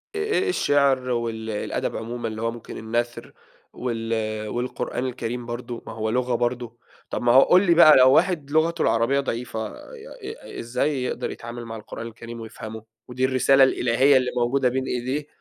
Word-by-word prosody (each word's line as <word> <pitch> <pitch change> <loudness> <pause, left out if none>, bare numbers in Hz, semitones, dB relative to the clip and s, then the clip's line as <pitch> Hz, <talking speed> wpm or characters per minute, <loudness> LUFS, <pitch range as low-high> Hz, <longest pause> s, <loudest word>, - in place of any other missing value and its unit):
آآ 415 -2 0
الشِعر 140 - +2
وال 115 -2 -2
الأدَب 105 - -3
عمومًا 120 +2 -4
اللي 110 0 -5
هو 115 0 0
ممكن 115 -1 -9
النَثْر 120 +2 -3 0.4
وال 115 -3 -3
والقرآن 125 +2 -3
الكريم 120 -1 -4
برضه 120 0 -6
ما - - -6
هو 110 0 -2
لغة 125 +1 0
برضه، 120 -1 -2 0.3
طَب - - -3
ما 120 0 +3
هو 130 - +8
قُل 185 +6 +5
لي 170 - +5
بقى 160 -2 +8
لو 130 0 +7
واحد 155 -3 +2
لغته 160 +2 +2
العربية 115 +5 +2
ضعيفة، 115 -4 -3
آآ - - -12 0.3
ي - - -8
إزاي 125 +3 -1
يقدر 125 0 -3
يتعامل 120 0 -8
مع 115 0 -7
القرآن 115 +1 -7
الكريم 115 +1 -9
ويفهمه 110 0 -8 0.2
ودي 130 +1 -1
الرسالة 135 +1 +4
الإلهية 130 +2 +4
اللي 130 -1 0
موجودة 125 +2 +2
بين 130 +1 -2
إيديه؟ 130 +5 -3
120 Hz, 170 wpm, -24 LUFS, 115-130 Hz, 0.4 s, هو